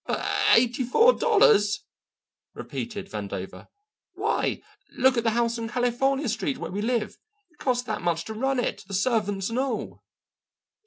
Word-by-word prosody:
"But - - -2 0.3
eighty 245 +2 +2
four 450 - +5
dollars!" 305 - +3 0.7
repeated 210 -5 -6
Vandover; 100 -2 -6 0.5
"why, - - -1 0.3
look 260 0 +4
at 235 - 0
the 230 - +3
house 235 0 0
on 225 0 -4
California 255 +3 0
Street 205 - -2
where - - -6
we 200 +2 -3
live. 225 -1 -1 0.3
It 350 - -31
costs 250 -2 0
that 250 - -4
much 170 -1 -1
to 220 - -6
run 265 +4 0
it, 245 - -2
the 195 - -4
servants 205 -1 0
and 240 - -1
all." 240 -5 -3
235 Hz, 155 wpm, -26 LUFS, 205-255 Hz, 0.7 s, four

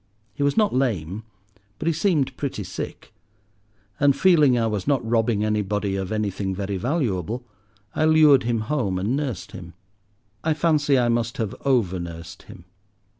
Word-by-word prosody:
He - - -7
was 140 +5 +1
not 215 -2 +3
lame, 110 - -1 0.5
but - - -6
he 165 - +2
seemed 160 -5 +1
pretty 135 -7 -4
sick; 95 - -7 0.9
and, 140 -1 +4
feeling 150 -9 +4
I 115 - +1
was 105 -2 -2
not 135 -5 +1
robbing 115 -2 +1
anybody 105 -2 -1
of 95 0 -3
anything 100 -3 -2
very 100 0 -3
valuable, 120 - -2 0.5
I 155 - +1
lured 155 -4 +6
him 115 -1 -1
home 110 -7 -1
and 105 +8 -1
nursed 140 -7 -4
him. 85 -2 -10 0.7
I 160 -1 +1
fancy 150 -3 +2
I 120 -1 +2
must 115 0 -1
have 110 -3 -2
over 110 -10 +2
nursed 85 -1 -8
him. 85 - -12
115 Hz, 160 wpm, -23 LUFS, 100-145 Hz, 0.9 s, lured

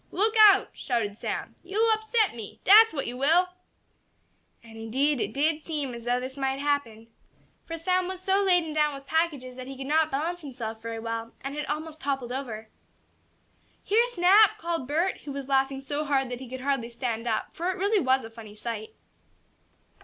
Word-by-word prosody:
"Look 425 +4 +1 0.2
out!" 395 0 +3
shouted 230 -6 -2
Sam. - - -4
"Yo'll 425 +5 +1
upset 440 0 +1
me! 225 -4 -9
Dat's 440 +3 +8
what 280 -4 -3
you 245 - -5
will!" 330 +7 +3 1.1
And 225 -1 -14
indeed 255 +5 0
it - - -2
did 305 +2 0
seem 295 -6 -3
as 235 -1 -9
though 245 +1 +1
this 260 +2 -7
might 270 -1 -1
happen. 280 -6 -2 0.6
For 330 - -5
Sam 365 +2 0
was 375 0 -5
so 385 +2 +1
laden 355 -5 +2
down 300 -1 +1
with 275 0 -11
packages 290 -6 -1
that 255 0 -7
he 270 -1 -8
could 265 - -6
not 310 +2 +2
balance 330 +6 -2
himself 235 -6 -6
very 230 0 -5
well, 230 0 -5
and 275 +1 -5
had 300 - -4
almost 310 +1 -5
toppled 270 -3 -2
over. 235 -5 -5 1.2
"Here, 455 +4 +3
Snap!" 400 -1 +5
called 335 -6 -3
Bert, 335 +6 0
who 290 - -8
was 275 -1 -6
laughing 270 0 +1
so 290 +2 -3
hard 275 -3 0
that 245 - -4
he 260 -2 -9
could 260 0 -6
hardly 270 -3 -1
stand 235 -1 -3
up, 220 -2 -2
for 340 - -5
really 405 +3 +2
it 375 - +1
was 260 +1 +2
a 225 - -9
funny 220 -2 -11
sight. 215 0 -6
275 Hz, 190 wpm, -27 LUFS, 245-335 Hz, 1.2 s, Dat's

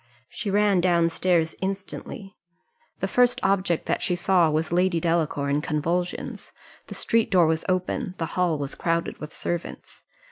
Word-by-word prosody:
She 215 - -5
ran 200 -2 +3
down 170 -2 +3
stairs 165 -2 +1
instantly. 195 +1 -5 0.7
The - - +1
first 245 0 +3
object 190 -3 +1
that - - -1
she 180 - 0
saw 175 -2 +3
was 155 +1 -1
Lady 180 0 +2
Delacour 160 -4 0
in 140 +1 +1
convulsions 165 +3 -2 0.4
the - - -8
street 230 -1 +1
door 180 -3 +5
was 160 0 0
open 185 +2 -1
the 165 - -1
hall 180 -4 +1
was 140 -1 -4
crowded 165 0 -1
with 150 0 -7
servants. 175 -1 -5
175 Hz, 155 wpm, -25 LUFS, 165-190 Hz, 0.7 s, door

